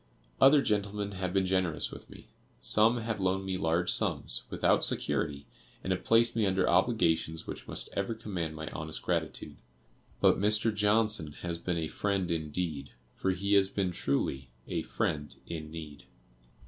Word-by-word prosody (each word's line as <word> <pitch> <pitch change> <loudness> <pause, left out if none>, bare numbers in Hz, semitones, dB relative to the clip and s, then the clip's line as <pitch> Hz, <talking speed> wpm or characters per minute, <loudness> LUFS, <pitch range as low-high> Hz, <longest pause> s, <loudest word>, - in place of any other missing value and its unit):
Other 140 +1 +7
gentlemen 105 0 -1
have 95 -2 -3
been 95 0 +1
generous 95 -3 0
with - - -11
me. - - -13 0.3
Some 110 +3 +6
have 115 -2 -3
loaned 95 0 0
me 95 -1 -2
large 85 0 +1
sums, - - 0
without - - +2
security, 70 -1 -1 0.4
and 95 - 0
have 90 - -5
placed 115 +1 +3
me 110 -3 +2
under 95 -1 +1
obligations 85 -5 +1
which - - -8
must - - -4
ever 100 +3 -2
command 90 -8 -4
my 80 0 -6
honest 80 0 -6
gratitude; - - -3 0.6
but - - +4
Mr. 105 +2 +2
Johnson 105 -6 +2
has 85 -1 -3
been 90 0 -2
a 80 -1 -2
'friend 95 -1 -1
indeed,' 80 -3 -3 0.2
for 95 - -1
he 100 +2 0
has 100 -1 +5
been 95 -2 -1
truly 70 -4 -2 0.2
a - - -2
'friend 75 -2 -3
in 80 -2 -6
need. 75 -3 -9
95 Hz, 160 wpm, -30 LUFS, 80-105 Hz, 0.6 s, Other